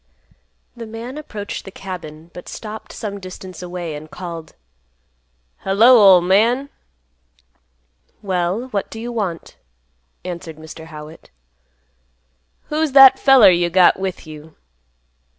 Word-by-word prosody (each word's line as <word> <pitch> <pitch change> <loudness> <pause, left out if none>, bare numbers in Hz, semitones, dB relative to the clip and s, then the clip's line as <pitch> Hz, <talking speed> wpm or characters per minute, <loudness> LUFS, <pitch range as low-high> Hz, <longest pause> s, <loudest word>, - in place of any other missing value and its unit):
The 230 -1 -8
man 230 +4 -8
approached 210 -9 -7
the - - -10
cabin, 170 -4 -9
but 180 - -10
stopped 215 0 -8
some 200 -2 -6
distance 185 0 -10
away 175 -2 -6
and 150 +1 -9
called, 170 -3 -8 1.0
"Hello, 225 +6 +5 0.2
ol' 180 - +4
man!" 230 +10 +2 1.5
"Well, 190 +5 -2
what 205 -5 -3
do 225 - -9
you 240 +2 -5
want?" 195 -8 -5 0.7
answered 170 -3 -7
Mr. 160 0 -11
Howitt. 155 0 -12 1.4
"Who's 305 -2 -1
that 270 -1 +9
there - - -21
feller 260 -8 +7
you 175 0 +1
got 185 +1 +4
with 190 -2 -5
you?" 155 0 -12
185 Hz, 120 wpm, -19 LUFS, 170-225 Hz, 1.5 s, that